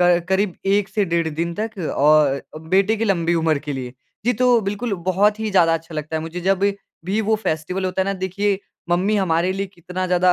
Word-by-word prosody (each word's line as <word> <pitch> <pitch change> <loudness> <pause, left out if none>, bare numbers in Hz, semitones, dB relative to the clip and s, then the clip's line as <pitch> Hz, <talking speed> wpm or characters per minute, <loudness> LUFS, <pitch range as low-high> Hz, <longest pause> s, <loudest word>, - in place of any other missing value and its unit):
क 175 -1 +4
करीब 190 -1 +1
1 200 0 +2
से 205 +1 0
डेढ़ 170 -2 0
दिन 165 +2 -2
तक 220 -1 -4 0.2
और 145 -1 +4 0.3
बेटे 195 +4 +3
की 225 - -1
लम्बी 170 -4 +1
उम्र 160 -2 +2
के 145 0 -5
लिए। 125 -2 -5 0.3
जी, 245 - +3
तो 245 0 +3
बिल्कुल 205 +3 -3
बहुत 205 +3 +3
ही 220 - -1
ज़्यादा 165 -4 +4
अच्छा 165 0 -6
लगता 155 +1 -3
है - - -1
मुझे 165 +2 -6
जब 190 +1 +1 0.4
भी 200 +4 0
वो 220 0 +1
फेस्टिवल 180 -1 -2
होता 185 0 -1
है - - -2
ना 195 - 0
देखिए 195 +2 0 0.3
मम्मी 195 +5 +2
हमारे 175 -2 +1
लिए 195 +1 -3
कितना 185 0 -5
ज़्यादा 180 0 +4
185 Hz, 215 wpm, -21 LUFS, 165-200 Hz, 0.4 s, क